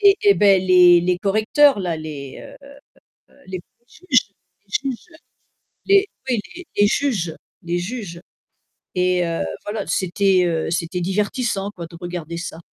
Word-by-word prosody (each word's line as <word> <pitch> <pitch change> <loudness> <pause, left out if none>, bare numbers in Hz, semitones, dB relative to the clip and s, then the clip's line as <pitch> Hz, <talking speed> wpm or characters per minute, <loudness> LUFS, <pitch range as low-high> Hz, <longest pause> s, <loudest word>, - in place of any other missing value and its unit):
Et 400 -1 +6
et 405 -1 +6
bah, 200 -2 +5
les 180 -1 +6
les 180 +1 0
correcteurs 215 +7 +3
là, 175 -4 -2
les, 145 -4 -8
heu - - -12 0.9
les 185 -1 -5 0.3
juges 260 - 0 0.4
les 270 +7 -1
juges. 240 - -8 0.8
Les, 395 +1 +4 0.2
oui, 240 - +1 0.4
les 205 0 +4
juges 200 - -1 0.3
les 175 +1 -2
juges. 180 -4 -6 0.7
Et, 180 -1 +2
heu, 165 - -2 0.2
voilà, 205 0 -4
c'était, 185 0 +2
heu, 160 -1 -1
c'était 170 +1 -2
divertissant 205 +2 -1
quoi 170 -4 -8
de 170 - -13
regarder 175 -2 -5
ça. 165 -1 -6
185 Hz, 140 wpm, -21 LUFS, 175-215 Hz, 0.9 s, Et